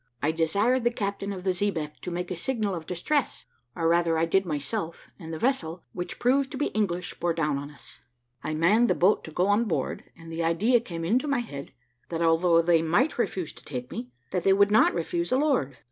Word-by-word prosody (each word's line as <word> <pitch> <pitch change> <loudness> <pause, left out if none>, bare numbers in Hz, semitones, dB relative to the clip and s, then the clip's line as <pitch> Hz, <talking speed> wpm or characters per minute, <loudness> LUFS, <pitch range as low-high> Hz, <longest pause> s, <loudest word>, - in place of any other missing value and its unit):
I 150 +4 +1
desired 200 +11 +1
the 240 - +4
captain 200 -3 -3
of 185 -2 -6
the 190 - +2
xebeque 175 -6 -2
to - - -6
make 180 +1 -4
a - - -1
signal 215 +2 -1
of 165 -3 -6
distress, 245 - -1 0.3
or 165 - 0
rather 170 -1 +3
I 165 - +2
did 190 +3 +1
myself, 165 +3 -4
and 165 -3 -8
the 160 - -4
vessel, 180 -8 -1
which 175 0 -5
proved 265 +2 +2
to - - -4
be 290 - 0
English, 180 -4 -1
bore 170 -1 0
down 150 -3 -1
to - - -12
us. - - -13 0.4
"I 155 - -2
manned 205 +10 +4
the - - +3
boat 190 +4 +3
to 160 - -9
go 180 +4 +1
on 205 +4 +3
board, 185 - -2
and 165 0 -11
the 165 +1 -2
idea 205 +10 +3
came 170 -8 -6
into 245 - +1
my 280 - +1
head, 140 -12 -8 0.4
that 170 0 -1
although 165 +1 +4
they 165 -1 +4
might 175 - +1
refuse 185 -8 -2
to - - -17
take 125 -3 -6
me, 125 - -6 0.2
that 180 - 0
they 195 +2 +4
would 200 +1 +4
not 215 - +5
refuse 170 0 -2
a 255 - +4
lord. 265 - +1
175 Hz, 225 wpm, -27 LUFS, 165-215 Hz, 0.4 s, not